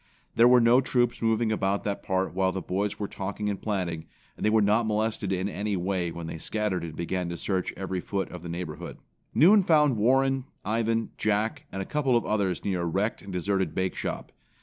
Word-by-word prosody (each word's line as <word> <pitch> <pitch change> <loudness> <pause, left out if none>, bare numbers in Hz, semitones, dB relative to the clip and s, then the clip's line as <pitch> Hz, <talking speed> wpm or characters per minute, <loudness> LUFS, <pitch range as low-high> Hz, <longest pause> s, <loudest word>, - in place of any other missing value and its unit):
There 115 +1 +6
were 125 0 +7
no 120 +2 +5
troops 120 -2 0
moving 115 0 +2
about 100 -2 0
that 100 -1 -2
part 95 -1 -1
while 95 0 +1
the 95 - -3
boys 100 +3 -2
were 105 - -3
talking 100 +2 -4
and 100 - -5
planning, 90 -6 -2 0.3
and - - -8
they 110 - +4
were 110 +1 +4
not 105 +3 +3
molested 110 -2 -1
in 95 0 0
any 100 0 -2
way 90 -1 -1
when 85 0 -7
they 80 0 -6
scattered 105 -1 -1
and 80 -2 -6
began 90 +1 -2
to 85 - -4
search 95 0 -1
every 95 -1 -3
foot 100 +1 -3
of 90 - -8
the 85 - -7
neighborhood. 85 -2 -6 0.4
Noon 200 +7 +7
found 150 -8 +4
Warren, 135 +4 +2 0.2
Ivan, 115 +1 0
Jack 110 +8 0
and 95 0 -3
a - - -10
couple 135 -5 +1
of 115 - -2
others 100 -4 -1
near 95 -3 0
a - - -1
wrecked 100 +7 -1
and 100 - -9
deserted 95 -1 -1
bakeshop. 95 -1 -3
100 Hz, 210 wpm, -27 LUFS, 95-115 Hz, 0.4 s, were